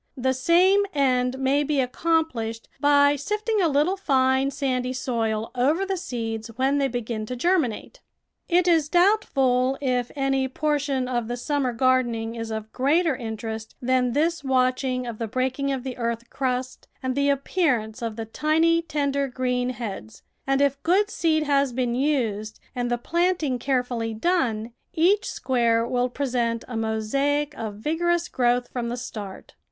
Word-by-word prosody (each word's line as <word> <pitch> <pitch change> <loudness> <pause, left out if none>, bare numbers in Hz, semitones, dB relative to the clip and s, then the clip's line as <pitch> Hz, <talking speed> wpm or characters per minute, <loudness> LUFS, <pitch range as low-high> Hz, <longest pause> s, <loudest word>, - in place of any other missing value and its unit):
The 260 +1 +1
same 350 +9 +4
end 255 -2 +2
may 270 +2 +2
be 290 -1 0
accomplished 250 -4 -1
by 285 0 +5
sifting 420 - -1
a 345 - +4
little 300 +5 +2
fine 265 -5 +2
sandy 260 -3 -1
soil 225 -4 -2
over 290 +10 +1
the 390 0 -1
seeds 225 -9 -4
when 270 +3 +1
they 275 - +2
begin 230 -3 -4
to 250 - -4
germinate. 335 - 0 0.5
It 355 0 +3
is 320 -4 +3
doubtful 270 -10 +3
if 250 -3 0
any 270 -1 +1
portion 285 -2 -1
of 240 -3 -1
the 240 +1 -3
summer 275 0 -1
gardening 235 -2 +1
is 230 -1 -5
of 220 0 -5
greater 305 +4 +2
interest 220 -2 -6
than 250 -1 +1
this 325 +2 +1
watch 255 -1 +2
ing 255 -1 -1
of 235 -3 -6
the 230 - -2
breaking 260 +4 -1
of 265 -2 -3
the 260 -2 -5
earth 235 0 -3
crust 255 -1 -3 0.2
and 260 0 0
the 280 +1 +1
ap 280 -1 +1
pearance 245 -12 0
of 230 -2 -3
the 225 0 -5
tiny, 320 +7 +2
tender 280 -3 -1
green 250 -1 -1
heads, 205 - -7 0.2
and 270 0 +2
if 280 0 0
good 395 +6 +2
seed 315 -2 +1
has 280 -2 +2
been 245 -1 0
used 235 -6 -1 0.2
and 245 -1 -1
the 240 - +1
planting 335 -2 0
care 260 -2 +1
fully 230 -3 -4
done, 235 -6 0 0.2
each 375 +6 +3
square 235 -3 +1
will 250 0 0
present 240 -3 -1
a 245 - -6
mosaic 275 +7 0
of 220 -5 -5
vigorous 340 +8 0
growth 245 0 +1
from 240 -2 -2
the 240 - -3
start. 210 -5 -8
260 Hz, 165 wpm, -24 LUFS, 240-290 Hz, 0.5 s, by